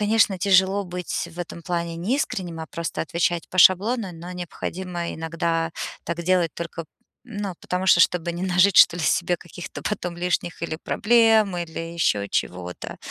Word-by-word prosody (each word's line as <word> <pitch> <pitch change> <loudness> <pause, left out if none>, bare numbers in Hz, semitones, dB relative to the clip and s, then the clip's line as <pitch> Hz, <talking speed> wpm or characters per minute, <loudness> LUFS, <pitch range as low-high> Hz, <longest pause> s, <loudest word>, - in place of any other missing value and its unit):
конечно, 210 -2 +3
тяжело 190 +1 +3
быть 180 -1 -4
в 170 - -14
этом 170 -1 -6
плане 170 -1 -3
неискренним, 180 - -2
а 160 - -6
просто 170 0 -4
отвечать 170 +1 -1
по 185 - -7
шаблону, 195 +3 +4
но 170 +2 -9
необходимо 175 0 -5
иногда 165 0 -1 0.3
так 170 +1 -3
делать 180 -2 +2
только 165 -1 -6 0.4
ну, 205 -5 -5
потому 180 +1 -3
что, 175 - +6
чтобы 175 -1 +2
не 175 +2 -5
нажить, 185 +1 +3
что 170 - +8
ли, 170 - -3
себе 175 +4 +1
каких-то 175 +1 -9
потом 180 -4 -3
лишних 175 -1 -2
или 165 -1 -3
проблем, 220 +1 +3
или 170 -2 -5
ещё 165 -12 0
чего-то. 90 -2 -4
175 Hz, 160 wpm, -24 LUFS, 170-190 Hz, 0.4 s, что